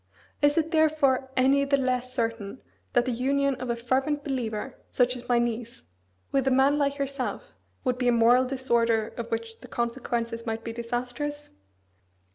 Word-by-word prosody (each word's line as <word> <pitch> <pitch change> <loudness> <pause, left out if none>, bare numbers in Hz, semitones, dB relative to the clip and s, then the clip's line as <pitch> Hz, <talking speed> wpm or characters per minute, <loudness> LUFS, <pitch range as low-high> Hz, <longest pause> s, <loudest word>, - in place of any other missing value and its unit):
Is 290 +2 +4
it 325 0 +1
therefore 300 -5 +3
any 270 +2 +4
the 280 0 +2
less 255 -1 -1
certain 230 -2 -3 0.3
that 245 0 +3
the 255 - 0
union 275 +3 +1
of 255 -1 -5
a 235 - +1
fervent 265 +5 0
believer, 250 -2 -3
such 250 0 +2
as 245 0 -10
my 245 - +4
niece, 235 0 -2 0.5
with 270 -1 +1
a - - +6
man 270 +3 +4
like 280 0 +1
yourself 275 - -4 0.3
would 250 -1 0
be 250 - +1
a - - +6
moral 240 +2 +5
disorder 235 -4 +1
of 235 -1 -7
which 225 -1 -4
the - - -12
consequences 235 -1 -2
might 225 -1 -3
be 230 - -5
disastrous? 245 +5 -4
250 Hz, 170 wpm, -27 LUFS, 235-275 Hz, 0.5 s, a